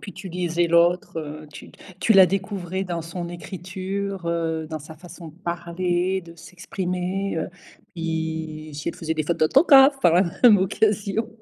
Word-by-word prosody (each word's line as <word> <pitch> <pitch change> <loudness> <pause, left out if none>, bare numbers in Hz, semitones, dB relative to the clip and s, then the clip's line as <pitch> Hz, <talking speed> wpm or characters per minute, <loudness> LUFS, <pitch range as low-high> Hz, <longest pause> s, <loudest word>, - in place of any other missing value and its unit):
Puis, 195 - -9
tu 190 +1 -9
lisais 175 -1 0
l'autre, 170 0 +2
heu, 155 0 -7
tu 145 - -11 0.3
tu 225 - +4
la 190 - +9
découvrais 190 -1 -3
dans 175 -3 -4
son 170 +1 -6
écriture, 185 +2 -5
heu, 165 -1 -1
dans 155 -1 -4
sa 155 +2 -11
façon 175 0 -11
de 155 - -15
parler, 175 +1 -2
de 170 0 -13
s'exprimer, 180 +2 -4
heu, 160 - -2 0.5
i 160 -2 -4
si 145 0 -4
elle - - -4
faisait 160 -1 -3
des 155 - -1
fautes 170 +3 -1
d'autographes 270 - +6
par 170 -8 +4
la 180 +3 +5 0.2
même 225 -4 +8
occasion. 205 +3 0
175 Hz, 170 wpm, -23 LUFS, 165-190 Hz, 0.5 s, la